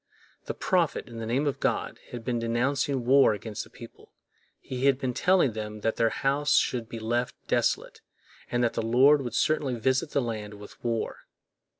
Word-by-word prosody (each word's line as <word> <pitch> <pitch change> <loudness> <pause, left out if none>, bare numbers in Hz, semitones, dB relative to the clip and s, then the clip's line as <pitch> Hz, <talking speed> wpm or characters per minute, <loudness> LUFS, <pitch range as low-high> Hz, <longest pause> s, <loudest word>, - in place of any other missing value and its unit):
The - - -4
prophet, 175 -4 0
in 115 -2 -9
the 115 - -4
name 130 +6 +1
of 145 - -1
God, - - -1
had 120 -2 -8
been 120 -2 0
denouncing 125 +3 0
war 135 -3 +5
against 105 +1 -6
the - - -16
people; 115 - -14 0.5
he 130 +1 -2
had 135 -2 +4
been 130 -2 -2
telling 180 0 +3
them 105 -1 -6
that 115 - -1
their 115 - +3
house 140 +4 +1
should 120 -3 0
be 115 - -6
left 120 +2 -1
desolate, - - 0 0.5
and 120 0 0
that 120 - +1
the - - -1
Lord 130 +6 +5
would 120 -3 -5
certainly 145 -5 +1
visit 130 +5 +1
the 140 - +1
land 105 -3 -5
with 105 0 -13
war. 115 -2 -3
120 Hz, 190 wpm, -27 LUFS, 115-135 Hz, 0.5 s, war